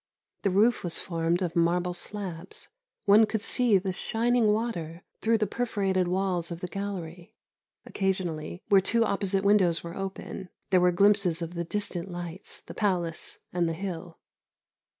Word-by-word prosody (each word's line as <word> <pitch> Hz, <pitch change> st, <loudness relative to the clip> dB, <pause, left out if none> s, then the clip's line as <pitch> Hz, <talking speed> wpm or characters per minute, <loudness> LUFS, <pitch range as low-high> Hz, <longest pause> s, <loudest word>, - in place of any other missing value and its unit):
The 200 Hz, -, +2 dB
roof 215 Hz, +6 st, +3 dB
was 175 Hz, -2 st, -1 dB
formed 170 Hz, +1 st, 0 dB
of 170 Hz, -2 st, -3 dB
marble 175 Hz, +1 st, +2 dB
slabs. 185 Hz, -1 st, -5 dB, 0.4 s
One 210 Hz, +1 st, +7 dB
could 220 Hz, -1 st, -2 dB
see 235 Hz, -3 st, +3 dB
the 190 Hz, 0 st, -2 dB
shining 230 Hz, +4 st, +1 dB
water 180 Hz, -7 st, -2 dB, 0.2 s
through 225 Hz, 0 st, +3 dB
the 215 Hz, -, +1 dB
perforated 195 Hz, -5 st, 0 dB
walls 180 Hz, -2 st, 0 dB
of 170 Hz, -1 st, -5 dB
the 180 Hz, -, -4 dB
gallery; 180 Hz, -3 st, -6 dB, 0.5 s
occasionally, 180 Hz, -4 st, -2 dB
where 195 Hz, -1 st, +6 dB
two 230 Hz, +4 st, +2 dB
opposite 195 Hz, -2 st, 0 dB
windows 195 Hz, -5 st, +4 dB
were 170 Hz, +1 st, -7 dB
open, 195 Hz, -1 st, -6 dB, 0.2 s
there 185 Hz, -1 st, +5 dB
were 180 Hz, 0 st, +5 dB
glimpses 190 Hz, -2 st, +3 dB
of 165 Hz, +1 st, -6 dB
the 170 Hz, -1 st, -2 dB
distant 190 Hz, -1 st, -3 dB
lights, 175 Hz, +1 st, -7 dB
the -, -, -10 dB
palace, 180 Hz, -6 st, -1 dB, 0.2 s
and 175 Hz, -2 st, +1 dB
the -, -, -1 dB
hill. 175 Hz, -1 st, -6 dB
185 Hz, 155 wpm, -28 LUFS, 170-205 Hz, 0.5 s, One